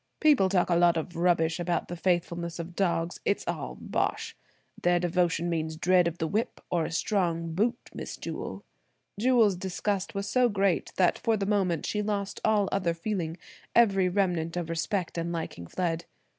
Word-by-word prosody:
People 290 Hz, -12 st, +5 dB
talk 180 Hz, -2 st, +2 dB
a -, -, +4 dB
lot 170 Hz, -1 st, +4 dB
of 165 Hz, +2 st, -4 dB
rubbish 170 Hz, -1 st, +2 dB
about 175 Hz, 0 st, -1 dB
the 175 Hz, -, -5 dB
faithfulness 170 Hz, -1 st, -1 dB
of 170 Hz, +1 st, -7 dB
dogs. 175 Hz, -3 st, 0 dB
It's 200 Hz, -, 0 dB
all -, -, -4 dB
bosh! -, -, -2 dB, 0.5 s
Their 175 Hz, 0 st, +3 dB
devotion 175 Hz, -1 st, +1 dB
means 160 Hz, -2 st, -2 dB
dread 180 Hz, +1 st, +4 dB
of 170 Hz, 0 st, -3 dB
the 160 Hz, -, -1 dB
whip, 215 Hz, +7 st, -1 dB
or 170 Hz, -3 st, +1 dB
a -, -, -5 dB
strong 165 Hz, -2 st, 0 dB
boot, 220 Hz, +7 st, +1 dB, 0.2 s
Miss -, -, -6 dB
Jewel." -, -, -6 dB, 0.6 s
Jewel's 230 Hz, -4 st, +4 dB
disgust 190 Hz, +2 st, -2 dB
was 200 Hz, 0 st, -2 dB
so 250 Hz, +1 st, +3 dB
great 195 Hz, -3 st, +1 dB
that 180 Hz, -2 st, +3 dB
for 225 Hz, -1 st, +1 dB
the 195 Hz, -, -1 dB
moment 190 Hz, -6 st, +1 dB
she 210 Hz, -, -1 dB
lost 200 Hz, -1 st, -2 dB
all 210 Hz, -2 st, +3 dB
other 175 Hz, -4 st, 0 dB
feeling, 170 Hz, -2 st, -3 dB, 0.4 s
every 195 Hz, -5 st, +5 dB
remnant 175 Hz, -3 st, 0 dB
of 170 Hz, -2 st, -3 dB
respect 170 Hz, +1 st, -2 dB
and 170 Hz, +1 st, -2 dB
liking 160 Hz, -, -5 dB
fled. 170 Hz, -, -2 dB
175 Hz, 175 wpm, -28 LUFS, 170-200 Hz, 0.6 s, People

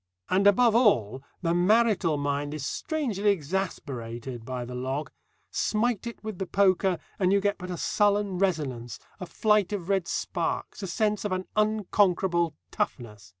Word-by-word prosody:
And, 195 Hz, +2 st, +4 dB
above 225 Hz, +3 st, +5 dB
all, 135 Hz, -, +3 dB, 0.2 s
the 165 Hz, 0 st, +2 dB
marital 190 Hz, -3 st, +3 dB
mind 145 Hz, +1 st, -2 dB
is 145 Hz, -3 st, -4 dB
strangely 235 Hz, -, -1 dB
exasperated 135 Hz, -, -3 dB
by 125 Hz, -1 st, -4 dB
the 125 Hz, -, -8 dB
log. 130 Hz, +4 st, -3 dB, 0.4 s
Smite 230 Hz, 0 st, 0 dB
it 235 Hz, -, -8 dB
with 215 Hz, -4 st, -6 dB
the 190 Hz, -, -3 dB
poker, 190 Hz, -1 st, +3 dB, 0.2 s
and 185 Hz, -1 st, +3 dB
you 200 Hz, -, +4 dB
get 200 Hz, +1 st, 0 dB
but 180 Hz, -1 st, -7 dB
a 180 Hz, -, -4 dB
sullen 205 Hz, 0 st, +1 dB
resonance, 140 Hz, -, -1 dB, 0.2 s
a 180 Hz, -, -6 dB
flight 210 Hz, -1 st, +2 dB
of 195 Hz, -3 st, -4 dB
red 195 Hz, -3 st, +1 dB
sparks, -, -, -3 dB
a 195 Hz, -, -4 dB
sense 210 Hz, +3 st, 0 dB
of 210 Hz, -, -2 dB
an 185 Hz, 0 st, -2 dB
unconquerable 190 Hz, -6 st, +2 dB, 0.2 s
toughness. 105 Hz, -6 st, -4 dB
185 Hz, 155 wpm, -27 LUFS, 145-205 Hz, 0.4 s, above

